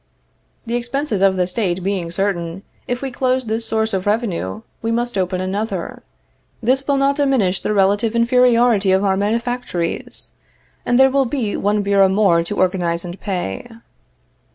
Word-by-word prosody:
The 230 - -4
expenses 240 -2 -1
of 195 -1 +4
the 180 -1 +1
State 180 -1 -2
being 190 -3 -2
certain, 175 -1 -2 0.2
if 245 +2 -3
we 270 - -3
close 255 0 0
this 225 +1 -2
source 220 -1 0
of 190 0 -2
revenue, 215 0 -1 0.2
we 225 - -2
must 240 0 -1
open 185 -1 -1
another; 190 0 -3 0.6
this 265 +3 0
will 280 -1 +2
not 275 +1 +2
diminish 260 -10 +1
the - - -2
relative 205 +3 +2
inferiority 235 -4 +3
of 190 +2 +2
our 190 -1 +2
manufactories, 220 -4 -2 0.6
and 245 - +3
there 265 0 +6
will 275 0 +2
be 235 -5 -2
one 205 +1 0
bureau 200 -1 +4
more 190 -4 +3
to 205 +5 -5
organize 175 -2 0
and 175 +2 -7
pay. 180 - -4
210 Hz, 160 wpm, -19 LUFS, 190-245 Hz, 0.6 s, there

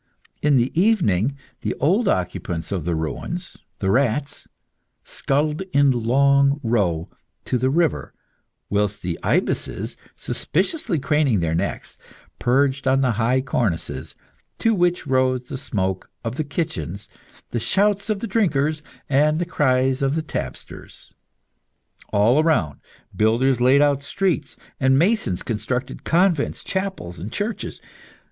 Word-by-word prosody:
In 145 -2 +4
the 120 +1 +2
evening, 140 - +2 0.2
the - - -2
old 195 +9 +2
occupants 90 -2 -2
of 90 -6 -2
the 85 -1 0
ruins, 80 - -4 0.2
the 95 -1 0
rats, 135 +4 0 0.6
scuttled 150 +4 -1
in 140 -1 +5
a - - -1
long 140 +4 +3
row 95 -9 +1 0.4
to 125 - 0
the 130 +2 +2
river, 165 +3 +1 0.6
whilst 105 0 -1
the 85 -2 -3
ibises, - - -1 0.2
suspiciously 190 - -1
craning 140 -5 +2
their 80 -2 0
necks, 90 +5 -3 0.4
perched 135 +2 +1
on 135 +1 +3
the 130 -2 +2
high 120 +4 +1
cornices, 115 -10 -2 0.4
to 225 - +2
which 175 -3 +1
rose 130 -2 +1
the 135 - -6
smoke 95 -8 -2
of 115 0 -3
the 155 - -1
kitchens, 105 - -4 0.4
the 120 - -1
shouts 205 - +1
of 210 -2 -1
the - - -2
drinkers, 155 -8 +1 0.3
and 150 +3 +3
the 175 - -1
cries 130 -4 +1
of 135 +1 +1
the 160 - -1
tapsters. - - -7 1.0
All 115 +8 +4
around, 90 - +1 0.4
builders 120 +4 +2
laid 135 +3 +5
out 140 -1 +2
streets, 160 -1 -1 0.2
and 130 0 +4
masons 170 - +1
constructed 125 +3 -3
convents, 175 -3 +1
chapels, 190 - -4
and 95 +6 -6
churches. 210 +2 -3
135 Hz, 135 wpm, -22 LUFS, 110-155 Hz, 1.0 s, in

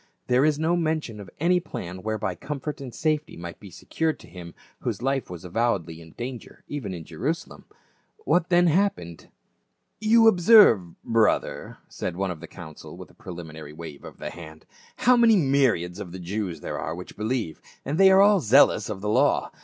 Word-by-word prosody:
There 125 +2 +3
is 150 -1 +2
no 160 +3 +1
mention 155 -9 -2
of 100 - -10
any 180 +3 +3
plan 90 - -7
whereby 110 -3 -2
comfort 145 - -6
and 130 -3 -7
safety 155 +3 -2
might 85 0 -8
be 100 - -12
secured 160 - -3
to - - -15
him 85 -1 -11 0.2
whose - - -4
life 135 0 -1
was 90 0 -9
avowedly 90 -5 -1
in 80 -1 -15
danger 125 0 -8
even 135 -9 -5
in 85 -3 -6
Jerusalem. 160 - -5 0.6
What 175 -1 +2
then 175 0 +4
happened? 175 - 0 0.4
" - - -50
You 230 -1 +7
observe, 175 - +5
brother," 115 -2 0
said 90 - -5
one 95 0 -2
of 85 - -7
the 85 - -10
council,* 80 -1 -11
with - - -11
a - - -24
preliminary 80 -4 -9
wave 75 -3 -10
of - - -11
the - - -6
hand, 80 -2 -12 0.2
" - - -27
how 250 +1 +7
many 235 -2 +5
myriads 130 - +1
of 90 -4 -7
the - - -6
Jews 95 0 -4
there - - -5
are - - -4
which 90 +1 -10
believe, 110 -6 -3 0.2
and 145 +6 -2
they 195 0 +8
are 190 0 +6
all 205 -1 +5
zealous 115 - +4
of 100 -3 -5
the 105 - -4
law. 105 - +2
110 Hz, 190 wpm, -25 LUFS, -, 0.6 s, they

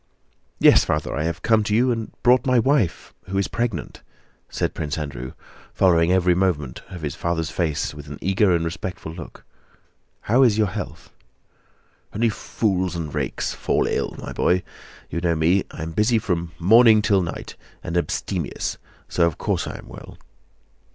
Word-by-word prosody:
"Yes, - - +6
Father, - - -1
I 75 - -1
have 85 +1 -3
come 110 -1 +4
to 105 0 0
you 125 +3 +3
and 115 -2 -3
brought 125 0 +5
my 130 -1 +4
wife 120 - +1
who 95 +1 -3
is 100 - +1
pregnant," 115 -9 -3 0.5
said - - -2
Prince 75 0 -3
Andrew, 65 -4 -5 0.4
following 85 -2 +4
every 90 -1 +4
movement 85 -8 -1
of 90 -3 -9
his 75 -3 -2
father's 85 -1 -2
face 80 -5 -1
with 75 0 -10
an 70 0 -7
eager 95 +2 +2
and 85 -1 +1
respectful 85 -1 -5
look. 85 -1 -10 0.8
"How 120 +5 +3
is 115 -5 +5
your 110 - +4
health?" - - -7 1.0
"Only 115 +2 +2
fools 95 -4 -1
and 80 -4 -4
rakes - - -2
fall - - 0
ill, - - -1
my - - -7
boy. 90 0 +2 0.5
You 85 - -2
know 85 -1 +1
me: 85 +5 +2
I 80 - -7
am 80 - -5
busy 105 +7 +2
from 85 -5 -2
morning 110 +4 +6
till 100 -4 +3
night 85 - -6 0.3
and 85 - -4
abstemious, 85 - -2 0.3
so 85 -1 +2
of 85 - -3
course - - -1
I - - -6
am - - -13
well." - - -11
90 Hz, 170 wpm, -23 LUFS, 85-105 Hz, 1.0 s, Yes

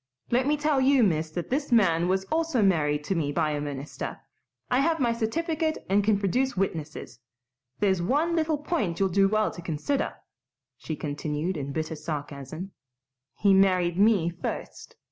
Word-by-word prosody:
Let 250 +3 +2
me 300 +1 +2
tell 295 -2 +1
you, 265 -1 +5
miss, 160 -5 +1
that 170 +6 -5
this 280 +1 -1
man 175 -7 +4
was 190 +1 0
also 320 -8 +1
married 150 -6 +2
to 195 - -1
me 155 -5 -1
by 155 0 0
a 145 -1 -2
minister. 145 0 -5 0.5
I 250 - +3
have 320 +3 +2
my 240 -3 +2
certificate 315 +7 -1
and 200 +1 +4
can 210 0 +3
produce 230 +6 0
witnesses. 155 -9 -3 0.6
There's 190 -3 +2
one 300 - +1
little 315 -2 +1
point 220 - -2
you'll 195 -1 +2
do 195 +2 +4
well 215 +1 +1
to 175 - -9
consider," 170 - -2 0.6
she 155 +5 -5
continued, 150 +4 -3
in 140 -2 -4
bitter 160 +2 -3
sarcasm, 150 +3 -6 0.6
"he 200 -1 +3
married 185 -2 +3
me 200 -5 +4
first. 175 - -6
190 Hz, 165 wpm, -27 LUFS, 155-255 Hz, 0.6 s, you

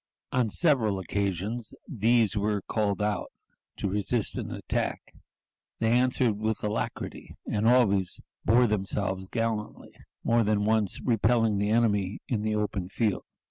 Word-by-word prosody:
On 125 -3 +1
several 115 - +2
occasions 100 +5 -3
these 115 -3 +2
were 105 -1 0
called 105 -2 -1
out 105 0 -1 0.5
to - - -2
resist 105 +3 -1
an - - -4
attack. - - -3 0.6
They 115 0 +1
answered 125 -3 +2
with 110 0 -2
alacrity, 105 0 -4
and 105 +1 0
always 100 -7 +3 0.2
bore 120 +3 +5
themselves 95 -2 -1
gallantly, 115 -1 -3 0.3
more 115 0 +3
than 105 -1 +1
once 110 -3 +1
repelling 115 -2 +2
the 105 +1 0
enemy 105 -4 +2
in 115 -5 -1
the 110 0 0
open 105 -3 -2
field. 105 -1 -1
105 Hz, 135 wpm, -28 LUFS, 100-115 Hz, 0.6 s, bore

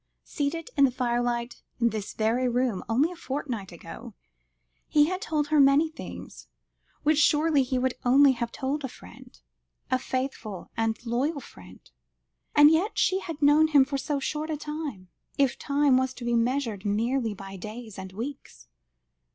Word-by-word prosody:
Seated 300 +3 -3
in 280 - +6
the - - +3
firelight 240 -1 -2 0.2
in 235 -1 +3
this 215 -2 -5
very 235 +4 +1
room, 245 -5 0
only 275 +9 +2
a - - -8
fortnight 260 - -5
ago, 195 +7 -10 0.7
he 295 -1 +4
had 370 +4 -3
told 305 -8 -1
her 305 -1 +3
many 280 +3 +5
things, - - -10 0.6
which 305 0 +3
surely 300 0 +4
he 255 0 -1
would 255 0 +1
only 270 +3 +6
have 235 -2 -3
told 275 +3 -2
to 270 - -3
a - - -14
friend 90 - -15 0.5
a 255 - +3
faithful 255 -7 -4
and 225 +1 -1
loyal 270 +6 -1
friend? 95 - -15 0.7
And 295 +1 +8
yet 355 +8 +1
she 380 - +2
had 325 -6 -6
known 295 +2 +6
him 285 -4 +5
for 275 0 -3
so 280 +2 -2
short 300 +3 -3
a 310 - -2
time, 300 - -6 0.3
if 275 -3 +2
time 280 -2 +3
was 260 0 -1
to 240 - -8
be 240 - 0
measured 235 -3 0
merely 225 +2 0
by 195 0 -9
days 215 +2 -8
and 190 0 -7
weeks. 240 - -8
260 Hz, 170 wpm, -27 LUFS, 230-295 Hz, 0.7 s, And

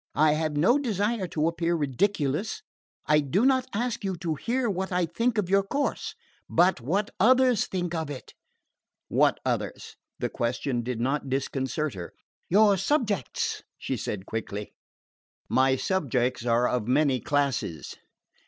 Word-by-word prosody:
I 155 0 +5
have 155 -1 -1
no 235 - +4
desire 215 -5 -1
to 160 -1 0
appear 170 +1 0
ridiculous. 155 - 0 0.4
I 150 0 +4
do 160 - +1
not 260 -1 +3
ask 235 +1 -2
you 190 -2 -1
to 165 -2 -2
hear 240 - -1
what 190 -2 -2
I 180 -1 +2
think 230 +7 -1
of 205 -4 +1
your 195 +2 +4
course, 280 +9 -2 0.3
but 175 -4 +3
what 190 - -1
others 250 +2 +4
think 175 -2 -3
of 160 -3 -2
it." 140 -3 -8 0.8
"What - - +3
others?" - - -3 0.2
The - - -2
question 120 +1 -1
did 120 -1 -4
not 135 +3 -1
disconcert 135 +1 -1
her. 90 -3 -8 0.4
"Your 205 +1 +5
subjects," 205 - -1 0.2
she - - -3
said 95 -2 -4
quickly. 105 -2 -5 0.7
"My 130 0 +3
subjects 130 -7 0
are 120 +1 +3
of 120 -4 -1
many 135 0 +3
classes." 130 - -1
160 Hz, 145 wpm, -27 LUFS, 130-200 Hz, 0.8 s, I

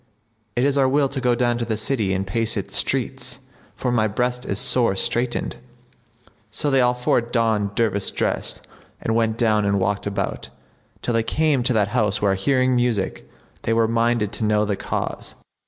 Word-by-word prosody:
it 125 +2 +2
is 140 0 +2
our 135 -1 +4
will 140 +1 +3
to 135 0 -5
go 125 -1 +2
down 120 0 +1
to - - -1
the 110 -2 -2
city 110 -3 -1
and 95 +1 -1
pace 115 +4 -1
its - - -3
streets, - - -1 0.4
for 125 - -2
my 110 -3 +2
breast 125 +4 -2
is 100 - -1
sore 115 -2 +3
straitened." 120 +5 -1 0.9
So 145 +6 -1
they 135 -1 +4
all 125 0 +3
four 125 0 +2
donned 115 -4 0
dervish 100 -4 +1
dress - - -2 0.4
and 115 - -1
went 115 -1 +1
down 110 -3 +2
and 100 0 +1
walked 100 +2 -1
about, 100 - -3 0.5
till 120 - -1
they 115 - +3
came 150 +3 +1
to 125 +1 +1
that 105 -2 +2
house 105 -3 +1
where, 100 -2 +2
hearing 130 +6 +2
music, 120 -5 -1 0.3
they 115 - 0
were 115 0 +3
minded 115 -2 +1
to - - -2
know 105 0 +2
the 100 -1 -1
cause. - - -4
115 Hz, 190 wpm, -22 LUFS, 105-125 Hz, 0.9 s, our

